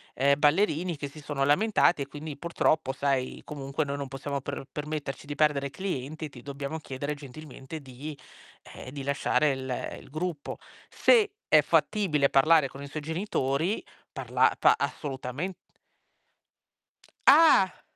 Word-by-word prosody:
ehm, 140 Hz, +2 st, +3 dB
ballerini 165 Hz, +1 st, +2 dB
che 145 Hz, 0 st, -4 dB
si 150 Hz, +2 st, -12 dB
sono 145 Hz, -2 st, -1 dB
lamentati 175 Hz, 0 st, +3 dB
e -, -, -10 dB
quindi 150 Hz, +1 st, -7 dB
purtroppo, 160 Hz, -3 st, +1 dB
sai, 135 Hz, -1 st, -1 dB
comunque 140 Hz, +1 st, -3 dB
noi 140 Hz, 0 st, -3 dB
non 140 Hz, -1 st, -4 dB
possiamo 140 Hz, +1 st, -4 dB
per 140 Hz, 0 st, -5 dB
permetterci 150 Hz, -2 st, -5 dB
di 145 Hz, -, -4 dB
perdere 145 Hz, -2 st, +2 dB
clienti, 155 Hz, -1 st, -4 dB
ti 125 Hz, -3 st, -13 dB
dobbiamo 140 Hz, +3 st, -5 dB
chiedere 145 Hz, +1 st, -4 dB
gentilmente 145 Hz, +1 st, -9 dB
di 140 Hz, +3 st, -8 dB, 0.6 s
ehm, -, -, -9 dB
di 140 Hz, 0 st, -6 dB
lasciare 140 Hz, +1 st, +2 dB
il 130 Hz, -1 st, -4 dB
il -, -, -16 dB
gruppo". 155 Hz, 0 st, -4 dB, 0.3 s
Se 440 Hz, -4 st, +4 dB, 0.2 s
è -, -, +6 dB
fattibile 155 Hz, -10 st, +2 dB
parlare 155 Hz, +1 st, +5 dB
con 140 Hz, -, -11 dB
i -, -, -7 dB
suoi 150 Hz, +2 st, -5 dB
genitori, 160 Hz, 0 st, -1 dB, 0.3 s
parla -, -, +2 dB
pa -, -, +6 dB
assolutamen 140 Hz, +5 st, -4 dB, 1.7 s
Ah! 280 Hz, -, +6 dB
145 Hz, 140 wpm, -28 LUFS, 140-160 Hz, 1.7 s, è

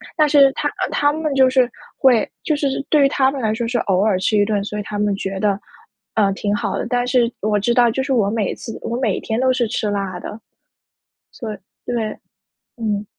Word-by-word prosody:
但 305 Hz, -2 st, +3 dB
是 280 Hz, -2 st, +6 dB
他 290 Hz, -, -1 dB
呃， -, -, -3 dB
他 290 Hz, 0 st, +2 dB
们 310 Hz, -1 st, -2 dB
就 265 Hz, -1 st, +5 dB
是 255 Hz, -1 st, +3 dB, 0.3 s
会 245 Hz, -5 st, +3 dB
就 305 Hz, -, +1 dB
是 285 Hz, -1 st, 0 dB, 0.2 s
对 300 Hz, -2 st, +4 dB
于 275 Hz, -, +5 dB
他 265 Hz, -1 st, +2 dB
们 275 Hz, -2 st, -5 dB
来 215 Hz, -1 st, +1 dB
说 230 Hz, +1 st, -2 dB
是 240 Hz, 0 st, 0 dB
偶 190 Hz, -2 st, +1 dB
尔 210 Hz, -4 st, +2 dB
吃 210 Hz, +3 st, +1 dB
一 205 Hz, -, +4 dB
顿， 205 Hz, -2 st, 0 dB
所 210 Hz, +1 st, -5 dB
以 -, -, -3 dB
他 205 Hz, 0 st, -5 dB
们 205 Hz, -1 st, +1 dB
觉 195 Hz, 0 st, -4 dB
得， 205 Hz, -1 st, +1 dB, 0.5 s
呃， 200 Hz, -3 st, +2 dB
挺 205 Hz, +1 st, -1 dB
好 200 Hz, -4 st, -2 dB
的， -, -, -3 dB
但 245 Hz, 0 st, 0 dB
是 245 Hz, -2 st, +2 dB
我 210 Hz, 0 st, +1 dB
知 235 Hz, +4 st, +1 dB
道 240 Hz, -1 st, +5 dB
就 265 Hz, +4 st, -1 dB
是 270 Hz, -1 st, -1 dB
我 205 Hz, -5 st, +2 dB
每 215 Hz, -3 st, -1 dB
次 225 Hz, -, -8 dB
我 230 Hz, +1 st, -3 dB
每 220 Hz, -7 st, 0 dB
天 220 Hz, +2 st, -2 dB
都 260 Hz, 0 st, +3 dB
是 245 Hz, -3 st, +1 dB
吃 215 Hz, -2 st, -2 dB
辣 195 Hz, -3 st, -3 dB
的。 215 Hz, -, -8 dB, 0.9 s
所 225 Hz, -4 st, -6 dB
以 -, -, -11 dB, 0.3 s
对， 230 Hz, -3 st, -3 dB, 0.6 s
嗯。 210 Hz, -2 st, -2 dB
230 Hz, 250 characters per minute, -20 LUFS, 205-260 Hz, 0.9 s, 是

